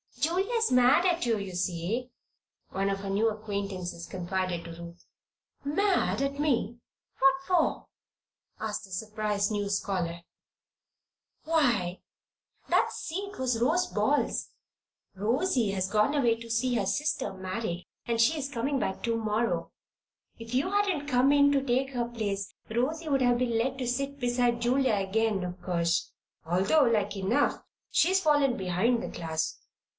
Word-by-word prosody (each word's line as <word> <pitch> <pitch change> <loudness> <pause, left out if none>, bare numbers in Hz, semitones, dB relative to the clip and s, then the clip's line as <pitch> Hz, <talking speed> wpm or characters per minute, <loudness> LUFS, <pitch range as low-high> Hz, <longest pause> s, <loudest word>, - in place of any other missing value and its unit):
"Julia's 395 +9 +1
mad 250 +7 +5
at 345 -5 +2
you, 230 -2 +2
you 195 -2 -5
see," 185 +7 -2 0.6
one 195 +1 -1
of 195 0 -1
her 195 0 -5
new 210 +4 +2
acquaintances 200 -5 -4
confided 180 -1 -2
to 170 0 -9
Ruth. 170 +1 -11 0.6
"Mad 370 +3 +1
at 275 +1 -1
me? 240 -6 0 0.4
What 270 0 +6
for?" 360 -3 +1 0.7
asked 215 -1 -3
the 195 - -17
surprised 210 +1 -1
new 205 -1 -1
scholar. 180 -4 -2 1.2
"Why, 235 - +1 0.7
that - - +3
seat 395 +5 -5
was 250 -3 0
Rosy 345 +9 +2
Ball's. - - +1 0.7
Rosy 235 - +1
has 190 -1 -1
gone 215 +7 +2
away 240 -5 +3
to 230 0 -11
see 245 +2 +1
her 210 -4 +1
sister 300 +2 -1
married 185 -1 -4 0.2
and 230 -1 0
she's 275 +3 +2
coming 275 +1 -1
back 190 - -3
to 230 -1 +1
morrow. 225 +1 -1 0.7
If 230 +1 -8
you 280 +9 +1
hadn't 395 -8 +1
come 260 0 +4
in 285 0 +5
to 275 -1 +2
take 265 +1 0
her 245 -2 -1
place, 205 -4 -3 0.2
Rosy 290 +9 -1
would 275 -2 +2
have 245 -1 +4
been 240 -2 0
let 260 +2 -1
sit 275 +3 -2
beside 245 -1 +1
Julia 250 -1 +2
again, 200 0 0
of 180 0 -6
course, 170 -1 0 0.3
although 190 - +3
like 215 -5 +1
enough 195 +4 +1 0.3
she's 380 +2 +4
fallen 290 -6 +3
behind 195 +6 +1
the - - -4
class. 160 -1 -3
230 Hz, 145 wpm, -29 LUFS, 195-275 Hz, 1.2 s, What